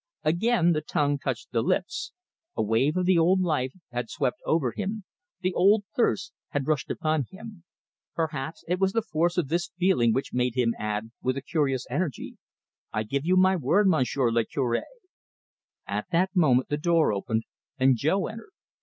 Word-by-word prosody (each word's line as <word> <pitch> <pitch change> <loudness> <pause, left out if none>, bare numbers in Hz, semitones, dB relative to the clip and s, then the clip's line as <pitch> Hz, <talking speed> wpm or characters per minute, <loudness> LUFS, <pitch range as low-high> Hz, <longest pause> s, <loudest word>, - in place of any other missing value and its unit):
Again 175 +2 +3
the 155 -2 +1
tongue 145 -2 0
touched 130 -4 -4
the 115 - +1
lips 360 - -1 0.5
a - - +2
wave 120 - +1
of 180 - +1
the 180 -2 +4
old 180 +3 +4
life 150 -8 0 0.2
had 120 -1 -3
swept 125 - -1
over 150 -7 +2
him, 210 - -4 0.4
the 185 0 0
old 200 +3 +4
thirst 120 - +1 0.2
had 145 -2 -2
rushed 150 -2 0
upon 155 -4 0
him. 210 -2 -11 0.5
Perhaps 160 -1 -3
it 180 +2 0
was 190 0 +2
the 230 - +1
force 170 -1 0
of 160 -6 0
this 170 +1 0
feeling 180 -11 +3
which 135 +5 -2
made 125 -1 0
him 120 -2 +2
add, 105 +1 -3
with 130 +1 -1
a - - -3
curious 135 -6 0
energy, 170 -9 -3 0.5
"I 110 - -1
give 140 +8 -3
you 185 +1 +4
my 185 +1 +5
word, 180 +6 +2
Monsieur 130 -7 +2
le 115 0 +2
Cure." 120 -1 -1 1.0
At - - -3
that 185 +3 +1
moment 130 -8 +3
the 145 - 0
door 165 -5 +2
opened 110 +3 -1 0.3
and 130 0 +4
Jo 155 - +1
entered. 225 - -9
155 Hz, 180 wpm, -26 LUFS, 125-185 Hz, 1.0 s, my